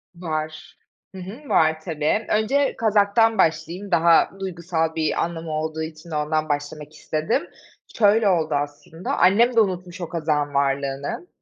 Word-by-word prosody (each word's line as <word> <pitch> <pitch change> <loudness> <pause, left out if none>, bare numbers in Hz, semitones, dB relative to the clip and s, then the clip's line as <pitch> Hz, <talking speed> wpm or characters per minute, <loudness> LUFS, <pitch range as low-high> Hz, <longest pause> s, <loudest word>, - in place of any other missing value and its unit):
Var, 155 -2 -5 0.4
hı - - -7
hı. 230 +11 -10
Var, 160 0 +3
tabii. 160 +6 -1
Önce 265 +6 +1
kazaktan 220 +1 +3
başlayayım, 170 +4 0
daha 170 0 +5
duygusal 170 -3 -2
bir 160 -1 0
anlamı 165 -1 -5
olduğu 155 +1 -3
için 160 +1 -9
ondan 155 +1 -1
başlamak 145 +1 -4
istedim. 160 - -2 0.5
Şöyle 215 0 +4
oldu 160 -4 +1
aslında. 145 +4 -4
Annem 230 +7 +4
de - - +5
unutmuş 185 -3 -1
o 170 - -4
kazağın 150 -3 -1
varlığını. 140 - -1
165 Hz, 135 wpm, -23 LUFS, 155-200 Hz, 0.5 s, daha